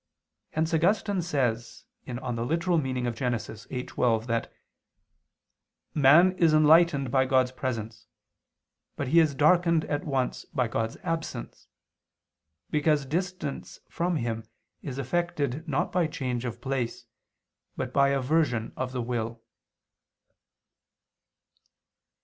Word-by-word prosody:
Hence 160 +1 0
Augustine 195 +3 +2
says 125 -9 -2 0.2
(Gen. 125 -2 -4
ad 120 - -2
lit. 155 +9 -1
viii, 125 - -2
12) 120 -4 0
that 115 -1 -2 1.4
"man 155 +6 +6
is 160 -3 +5
enlightened 155 -3 +5
by 130 -1 +3
God's 130 -1 +3
presence, 115 -4 -5 0.9
but 140 - -3
he 165 +4 +6
is 155 -4 +3
darkened 165 +2 +4
at 145 0 -2
once 135 -4 -2
by 130 -6 -1
God's 115 0 -2
absence, 165 -2 -4 1.0
because 150 -1 +2
distance 170 0 -4
from 175 0 -1
Him 115 -5 -2 0.4
is 135 -2 -6
effected 150 0 -2
not 145 - 0
by 175 -3 +2
change 130 -6 -3
of 120 - -5
place 130 -3 -3 0.7
but 130 0 -4
by 140 -1 +4
aversion 135 -4 +1
of 130 0 -4
the 125 -2 -2
will." 115 -1 -3
135 Hz, 110 wpm, -27 LUFS, 125-160 Hz, 1.4 s, man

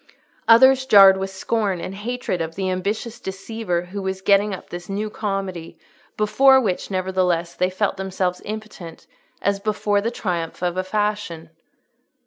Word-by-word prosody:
—others 260 +3 +6
jarred 195 -5 +8
with 190 0 -3
scorn 195 0 -1
and 185 - -6
hatred 215 -3 -3
of 165 0 -4
the 190 -1 -1
ambitious 205 +5 -3
deceiver 195 -2 -4
who 195 +3 -7
was 190 0 -3
getting 200 +1 +3
up 190 - -8
this 175 +1 -8
new 210 +2 -3
comedy, 195 -6 -4 0.4
before 265 +6 +5
which, 195 -8 -2
nevertheless, 185 -3 0
they 180 +1 0
felt 195 +2 -1
themselves 185 -1 -2
impotent, 215 -6 -8 0.4
as 200 0 +1
before 205 0 0
the 225 - -1
triumph 175 -7 -4
of 175 0 0
a 185 - -1
fashion. 195 -5 -3
195 Hz, 150 wpm, -22 LUFS, 180-215 Hz, 0.4 s, jarred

